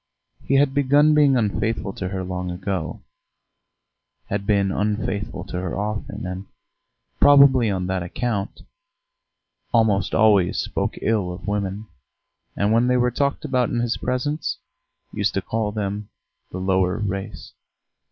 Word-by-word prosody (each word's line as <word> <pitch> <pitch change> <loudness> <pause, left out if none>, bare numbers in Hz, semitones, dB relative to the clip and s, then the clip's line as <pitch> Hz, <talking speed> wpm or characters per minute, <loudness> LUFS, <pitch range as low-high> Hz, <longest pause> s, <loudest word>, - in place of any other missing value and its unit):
He 135 - +1
had 135 0 +3
begun 145 +2 +4
being 145 -3 +5
unfaithful 105 -2 -1
to 95 - -4
her 95 -1 -3
long 90 0 -4
ago 90 -2 -4 1.3
had 100 0 -3
been 100 -2 +2
unfaithful 105 0 -2
to 90 - -5
her 95 -1 -3
often, 105 -1 -4
and, 95 +1 -6 0.7
probably 140 -5 +6
on 95 -2 -1
that 95 0 -1
account, 100 +3 -3 1.1
almost 105 -6 +2
always 105 -5 +4
spoke - - -2
ill 105 -5 +1
of 90 - -9
women, 100 +1 -2 0.7
and 100 +1 +1
when 115 +2 +3
they 125 0 +3
were 125 0 +2
talked 140 +5 -1
about 130 -4 +1
in 120 - -1
his 120 0 0
presence, 145 +5 -2 0.6
used 100 0 -1
to 95 - +1
call 110 -2 -2
them 105 0 -4 0.4
"the - - -6
lower 95 0 +1
race." 100 0 -5
105 Hz, 140 wpm, -22 LUFS, 95-120 Hz, 1.3 s, probably